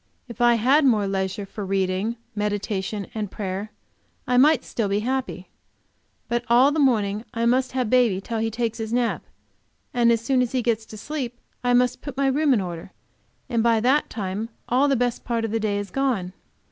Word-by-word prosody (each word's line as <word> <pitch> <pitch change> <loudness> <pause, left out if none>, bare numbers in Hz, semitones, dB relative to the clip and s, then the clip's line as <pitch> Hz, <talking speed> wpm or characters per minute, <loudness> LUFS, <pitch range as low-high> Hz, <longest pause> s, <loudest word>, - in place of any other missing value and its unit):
If 235 -1 -8
I 240 0 +5
had 265 +7 +4
more 220 -7 +3
leisure 195 +1 -2
for 205 +1 -7
reading, 195 +3 -1 0.2
meditation 205 -1 -2
and 215 -3 -3
prayer, 195 +1 -4 0.6
I 250 - 0
might 275 +1 +5
still 225 -3 -2
be 200 +1 +1
happy. 250 -7 -3 0.8
But 240 0 -1
all 250 +4 +6
the 310 - -1
morning, 215 -6 +2
I 230 0 0
must 255 +2 +2
have 255 -3 0
baby 235 -5 +3
till 225 +3 -4
he 225 0 0
takes 230 0 -2
his 220 0 -4
nap, 240 -1 0 0.7
and 235 -1 +4
as 230 - +3
soon 250 +3 +1
as 250 0 -1
he 255 -2 0
gets 225 -2 0
to 215 - -10
sleep 245 -1 -5 0.2
I 245 0 +3
must 250 0 +2
put 280 -3 -7
my 275 - +1
room 285 +2 +2
in 235 -6 +3
order, 175 0 -6 0.6
and 235 -4 0
by 230 -1 +3
that 260 +6 +2
time 210 +1 -4 0.2
all 260 +4 +3
the 275 - +3
best 245 -1 -1
part 230 -2 -1
of 220 - -4
the 225 - 0
day 210 -2 0
is 205 -2 -5
gone. 235 -9 -1
230 Hz, 200 wpm, -24 LUFS, 205-250 Hz, 0.8 s, all